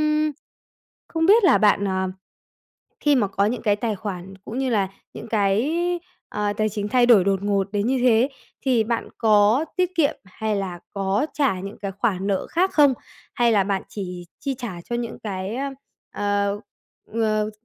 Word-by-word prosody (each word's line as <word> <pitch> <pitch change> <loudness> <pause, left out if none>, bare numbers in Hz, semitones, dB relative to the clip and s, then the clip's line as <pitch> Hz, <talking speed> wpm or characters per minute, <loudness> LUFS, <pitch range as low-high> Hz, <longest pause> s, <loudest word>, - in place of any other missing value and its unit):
Ưm, 305 0 +2 0.8
không 325 -1 0
biết 420 +3 +6
là 365 - +6
bạn, 205 -2 +4
ờ, 190 -1 -1 0.9
khi 295 -1 +4
mà 210 -6 +2
có 200 +1 +1
những 240 +4 -2
cái 205 -2 +2
tài 215 0 -2
khoản 190 -2 -6
cũng 235 - -5
như 265 -1 0
là 200 -4 +1 0.3
những - - -8
cái, 220 +10 +1 0.5
ờ, 210 0 -1
tài 215 +1 0
chính 205 0 -3
thay 245 +1 +4
đổi 220 -7 +6
đột 195 -1 +1
ngột 200 -1 0
đến 205 0 0
như 260 +2 +1
thế, 245 +1 +4 0.3
thì 250 -5 +2
bạn 230 +1 -2
có 215 +5 +4
tiết 365 0 +1
kiệm 300 -4 +2
hay 210 +2 -3
là 185 -3 -3 0.2
có 195 +6 0
trả 265 -11 +1
những 200 +2 -7
cái 195 -1 -4
khoản 195 -2 -1
nợ 195 -2 0
khác 370 +3 +1
không? 285 -3 +5 0.4
Hay 240 -1 +3
là 200 -3 +3
bạn 195 -1 -1
chỉ 180 -3 -6
chi 275 -1 -2
trả 215 -9 -6
cho 240 - -3
những 235 -1 -4
cái, 195 +2 -3
ơ, 275 +1 -2 0.4
ờ, 205 0 0 0.6
ờ, 215 -1 +1
210 Hz, 185 wpm, -23 LUFS, 200-250 Hz, 0.9 s, biết